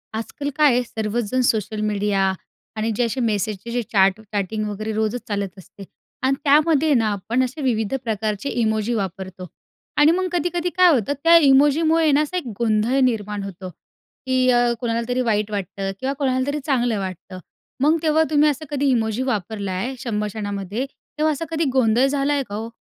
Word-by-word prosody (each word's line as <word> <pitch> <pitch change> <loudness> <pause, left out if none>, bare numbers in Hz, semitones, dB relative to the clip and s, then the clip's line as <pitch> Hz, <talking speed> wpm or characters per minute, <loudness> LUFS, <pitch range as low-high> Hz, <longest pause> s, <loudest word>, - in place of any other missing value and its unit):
आजकाल 285 +6 -4
काय 295 -4 +5
आहे, 250 - +2
सर्वचजण 225 +1 -2
सोशल 220 -3 0
मीडिया 205 -2 +1 0.4
आणि 220 +1 -1
जे 245 - +1
असे 235 +3 -3
मेसेजचे 215 -1 -2
जे 245 +1 0
चॅट 195 -1 +3
चॅटिंग 215 0 -3
वगैरे 215 +2 -4
रोजच 220 +3 -1
चालत 200 -3 -3
असते 195 +1 -13 0.4
आणि 265 +1 +2
त्यामध्ये 305 +1 +4
ना 225 -4 +2
आपण 225 +6 -1
असे 260 +5 -4
विविध 225 -4 0
प्रकारचे 215 +2 -2
इमोजी 220 -1 0
वापरतो. 190 -3 -5 0.5
आणि 295 +2 +6
मग 370 +2 0
कधी-कधी 350 0 -1
काय 365 0 +7
होतं 250 0 0
त्या 335 0 +7
इमोजीमुळे 305 +2 +4
ना 285 +1 +4
असा 305 +4 -2
एक 345 - -4
गोंधळ 230 +3 +2
निर्माण 210 -4 -1
होतो 190 -1 -7
की 255 - -3
अ, 240 -1 +3
कोणाला 230 -1 -1
तरी 250 +1 +1
वाईट 215 -3 0
वाटतं 195 -1 -3
किंवा 265 +1 -1
कोणाला 260 -2 +1
तरी 290 +1 -1
चांगलं 245 -6 +1
वाटतं. 185 0 -7 0.4
मग 310 +3 +4
तेव्हा 315 0 +3
तुम्ही 300 0 +4
असं 300 +2 -3
कधी 285 -1 0
इमोजी 225 -2 0
वापरलाय, 210 -1 -3
संभाषणामध्ये 210 0 -3
तेव्हा 305 +3 -3
असा 300 +3 -4
कधी 325 0 0
गोंधळ 245 -1 +3
झालाय 280 0 0
का 205 - -5
हो? 225 +2 -5
235 Hz, 170 wpm, -22 LUFS, 210-275 Hz, 0.5 s, काय